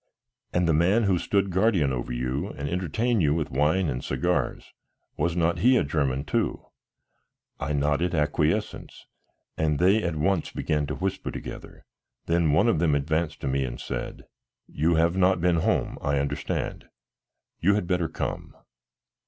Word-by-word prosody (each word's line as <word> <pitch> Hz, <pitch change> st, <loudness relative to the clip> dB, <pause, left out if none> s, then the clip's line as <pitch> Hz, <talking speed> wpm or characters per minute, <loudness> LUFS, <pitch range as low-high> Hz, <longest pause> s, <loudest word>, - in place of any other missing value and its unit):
"And 90 Hz, -1 st, +1 dB
the 80 Hz, -, +3 dB
man 95 Hz, +9 st, +3 dB
who 95 Hz, -4 st, +2 dB
stood 100 Hz, +1 st, 0 dB
guardian 95 Hz, -7 st, +2 dB
over -, -, -4 dB
you 65 Hz, +7 st, -2 dB
and 70 Hz, -8 st, -6 dB
entertained 95 Hz, +7 st, 0 dB
you 75 Hz, -2 st, +2 dB
with 80 Hz, -2 st, -2 dB
wine 75 Hz, +7 st, +2 dB
and 65 Hz, -3 st, -3 dB
cigars, 70 Hz, +2 st, -1 dB, 0.4 s
was 85 Hz, 0 st, -1 dB
not 85 Hz, 0 st, +1 dB
he 125 Hz, +6 st, +5 dB
a -, -, +2 dB
German 70 Hz, -2 st, -1 dB
too?" -, -, -1 dB, 0.9 s
I 70 Hz, +3 st, -2 dB
nodded 75 Hz, +5 st, +1 dB
acquiescence 75 Hz, +1 st, -1 dB, 0.5 s
and 75 Hz, -2 st, +1 dB
they 95 Hz, +6 st, +4 dB
at 85 Hz, -4 st, -2 dB
once 80 Hz, +3 st, 0 dB
began 75 Hz, -2 st, -1 dB
to 75 Hz, -, -3 dB
whisper 95 Hz, 0 st, -3 dB
together; -, -, -9 dB, 0.4 s
then 85 Hz, -2 st, +2 dB
one 80 Hz, +10 st, +3 dB
of 115 Hz, -9 st, +2 dB
them 80 Hz, -3 st, +2 dB
advanced 80 Hz, +2 st, -1 dB
to -, -, -3 dB
me 70 Hz, +1 st, 0 dB
and -, -, -5 dB
said: -, -, -5 dB, 0.4 s
"You 80 Hz, +3 st, 0 dB
have 85 Hz, +2 st, +2 dB
not 95 Hz, -1 st, +3 dB
been 85 Hz, 0 st, +2 dB
home, 80 Hz, -, 0 dB
I 70 Hz, 0 st, 0 dB
understand; 70 Hz, +1 st, -3 dB, 0.7 s
you 100 Hz, +4 st, +3 dB
had 105 Hz, -, -1 dB
better 90 Hz, -2 st, 0 dB
come." -, -, -5 dB
80 Hz, 160 wpm, -26 LUFS, 70-90 Hz, 0.9 s, he